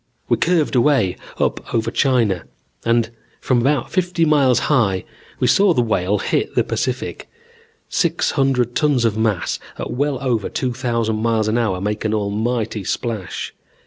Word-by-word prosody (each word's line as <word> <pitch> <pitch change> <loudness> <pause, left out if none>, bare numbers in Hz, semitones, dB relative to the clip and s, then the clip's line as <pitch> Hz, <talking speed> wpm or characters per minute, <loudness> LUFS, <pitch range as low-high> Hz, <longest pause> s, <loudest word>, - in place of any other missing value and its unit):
We 120 - +3
curved 165 0 +1
away 120 -7 +3 0.2
up - - -2
over 115 0 0
China 115 - +1 0.4
and 115 -1 +1 0.3
from 125 -2 +1
about 135 0 +1
fifty 180 -2 +1
miles 140 -5 +4
high 105 -10 +2 0.4
we - - +1
saw 195 -4 +4
the 125 - +3
Whale 105 -3 +1
hit - - -1
the - - +3
Pacific. - - -3 0.6
Six - - 0
hundred 125 -3 +1
tons 140 -5 +2
of 110 -2 +1
mass 110 -4 0 0.2
at - - -5
well 145 +1 0
over 120 -6 -1
two 125 -2 -2
thousand 115 -3 -1
miles 115 -2 +1
an 110 +2 +1
hour 100 -6 0
make 105 +2 -2
an 110 0 0
almighty 110 +1 -1
splash. 110 -1 -3
115 Hz, 155 wpm, -20 LUFS, 110-135 Hz, 0.6 s, miles